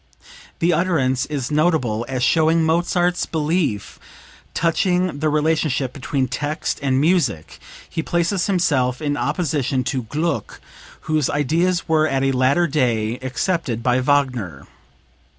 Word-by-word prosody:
The 170 +1 +2
utterance 150 -7 +1
is 145 -3 -3
notable 150 -8 +1
as 130 -2 -2
showing 160 +2 +3
Mozart's 175 +2 +1
belief 155 - -1 0.6
touching 180 -1 +1
the 155 +1 +1
relationship 150 -4 0
between 135 -1 -2
text 145 +5 -3
and 135 -2 +1
music; 155 - 0 0.3
he 160 - -3
places 175 +3 0
himself 140 -10 +1
in 145 -2 -1
opposition 145 -6 -1
to 130 0 -2
Gluck 155 +9 -3 0.4
whose 155 -3 0
ideas 165 +5 0
were 155 -1 +3
at 135 -3 0
a 135 - +2
later 135 +6 +2
day 120 -6 0
accepted 130 - -2
by 125 0 +2
Wagner. 125 - 0
150 Hz, 125 wpm, -21 LUFS, 130-165 Hz, 0.6 s, showing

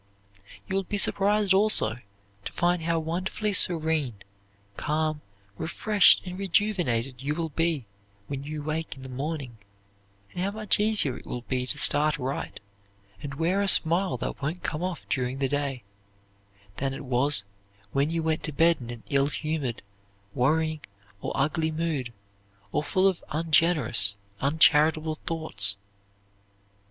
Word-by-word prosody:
You 190 - -3
will 195 - +2
be 205 - -1
surprised 200 0 +3
also 190 - +4 0.5
to - - -4
find 175 0 0
how 165 +1 0
wonderfully 180 +6 -2
serene, 160 - +3 0.6
calm, 155 +2 -2 0.4
refreshed, 205 +4 +3
and 180 +1 -7
rejuvenated 170 - 0
you 145 +2 -2
will 165 -1 -2
be 160 -3 0 0.4
when 140 +2 -6
you 150 +1 -6
wake 155 +2 -4
in 135 - -13
the 130 - -9
morning, 135 -3 -5 0.7
and 180 - -4
how 195 - 0
much 215 0 0
easier 210 - +2
it - - -14
will 125 -1 -5
be 125 0 -2
to 145 - -2
start 150 +1 +5
right, 135 0 -5 0.6
and 140 -1 -7
wear 175 +6 0
a 200 - 0
smile 170 -5 +4
that 120 - -5
won't 155 +6 -4
come 155 +1 -3
off 180 -3 -5
during 130 0 -2
the 135 -1 0
day, 140 -3 -3 0.9
than 135 0 -2
it 140 - -8
was 125 -2 +2 0.5
when 140 +5 +1
you 165 0 -2
went 160 -1 0
to 155 - -4
bed 165 +3 +3
in 120 - -9
an 120 -2 -8
ill 140 0 +3
humored, 150 -5 -3 0.5
worrying 155 +4 0 0.4
or - - -4
ugly 155 +3 0
mood, 155 -6 -3 0.6
or - - 0
full 190 +5 +2
of 190 -3 -1
ungenerous, 150 - +2 0.3
uncharitable 155 +2 +3
thoughts. 105 -12 +3
155 Hz, 145 wpm, -26 LUFS, 135-170 Hz, 0.9 s, start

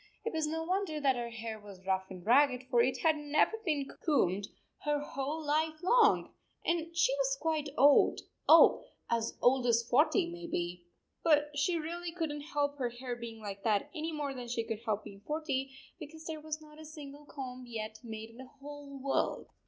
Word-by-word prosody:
It 460 - -2
was 315 -1 0
no 325 +1 -2
6 - - -8
wonder 365 -4 0
that 275 -3 +3
her 240 -1 -3
hair 225 -1 -6
was 200 -3 -13
rough 190 0 0
and 185 -2 -9
ragged, 255 +2 +4
for 240 -2 +5
it 255 +2 +2
had 320 -2 +4
never 295 +8 +2
been 295 -7 0 0.2
combed 205 - +2 0.3
her 295 0 0
whole 290 +2 -4
life 310 +2 +1
long, 450 +3 +4 0.3
and 335 0 -1
she - - +4
was - - +1
quite 310 -2 0
old 285 +1 +6 0.3
oh, 325 - +8 0.3
as 230 -1 0
old 250 0 +4
as 235 0 +3
forty, 310 +9 +4
maybe! 180 - -4 0.4
But 295 -2 +4
she 310 +5 +1
really 340 +2 -4
could 330 -3 -2
n 295 - -4
t 290 - -9
help 290 -1 0
her 250 -2 0
hair 245 +1 -5
being 230 -2 -8
like 200 -1 -6
that 210 -2 +1
any 320 -1 -3
more 295 -3 -3
than 250 -2 -7
she 235 -1 -1
could 225 -1 -4
help 215 -2 0
being 195 0 -11
forty, 300 -3 -1 0.3
because 315 0 -10
there 315 -2 -5
was 310 0 -4
not 305 0 -14
a - - -10
single 295 -2 -10
comb 255 -3 -7
yet 220 -2 -5
made 220 -1 -7
in 230 - -16
the 260 0 -10
whole 285 0 -9
world 270 +1 -1
285 Hz, 200 wpm, -32 LUFS, 235-315 Hz, 0.4 s, oh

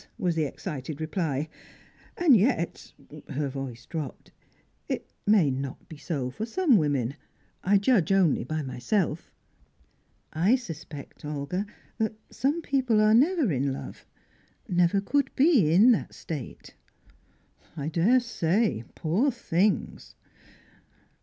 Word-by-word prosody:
was 180 -6 0
the 160 -2 0
excited 145 -1 -6
reply. 155 -3 -2 0.7
"And 330 -7 +6
yet" 205 -5 0 0.4
her 145 0 -2
voice 130 -3 -6
dropped 155 -6 -6 0.6
"it - - -3 0.2
may 195 -9 +5
not 135 0 -5
be 160 - -10
so 140 -5 -3
for 175 - -5
some 275 +4 +3
women. 140 -5 0 0.5
I 200 +2 +4
judge 200 -4 +2
only 185 -10 +3
by 155 +5 -3
myself." 150 - -2 1.0
"I 180 +10 +3
suspect, 160 - -8
Olga, 150 +7 -3 0.3
that 220 -1 0 0.2
some 295 +5 -1
people 260 -7 +2
are 215 0 +5
never 290 - +3
in 135 0 0
love 135 - -8 0.6
never 180 +2 +2
could 275 +6 +1
be 265 - +4
in 205 +9 +7
that 230 - -1
state." 145 -7 -7 1.0
"I 145 -1 -3
daresay, 195 - +1
poor 190 - +1
things!" 210 -5 -1
175 Hz, 120 wpm, -27 LUFS, 145-225 Hz, 1.0 s, in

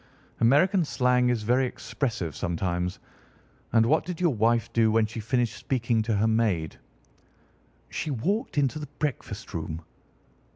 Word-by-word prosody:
"American 170 - +4
slang 125 -4 +2
is 120 -3 0
very 125 +4 +2
expressive 110 - -3
sometimes. 90 +1 -2 0.7
And 115 0 +4
what 155 +7 +3
did 180 -2 -6
your 175 -5 +2
wife 115 0 +1
do 110 -1 +4
when 110 0 +3
she 115 +2 -6
finished 120 +1 0
speaking 120 -2 0
to 110 0 0
her 105 +2 +2
maid?" 110 -8 0 1.1
"She - - -3
walked 185 - -1
into 145 +1 +1
the 150 - -6
breakfast 120 -8 -4
room." 80 0 -4
115 Hz, 140 wpm, -27 LUFS, 110-135 Hz, 1.1 s, American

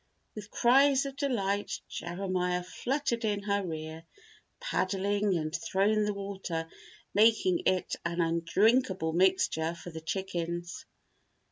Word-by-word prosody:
With 210 -1 -8
cries 270 +4 +4
of 275 -1 -5
delight, 205 -8 -1
Jeremiah 180 0 -2
fluttered 240 - -2
in 205 -2 0
her 200 -1 0
rear, 160 -1 -6 0.6
paddling 200 - 0
and 155 0 -3
throwing 205 +5 +1
the 210 - 0
water, 190 -5 -4 0.5
making 210 -4 +4
it 185 -1 +1
an 170 0 -2
undrinkable 170 +2 +2
mixture 170 -2 +2
for 175 +1 -9
the 160 0 -7
chickens. 175 0 -4
190 Hz, 115 wpm, -30 LUFS, 170-210 Hz, 0.6 s, cries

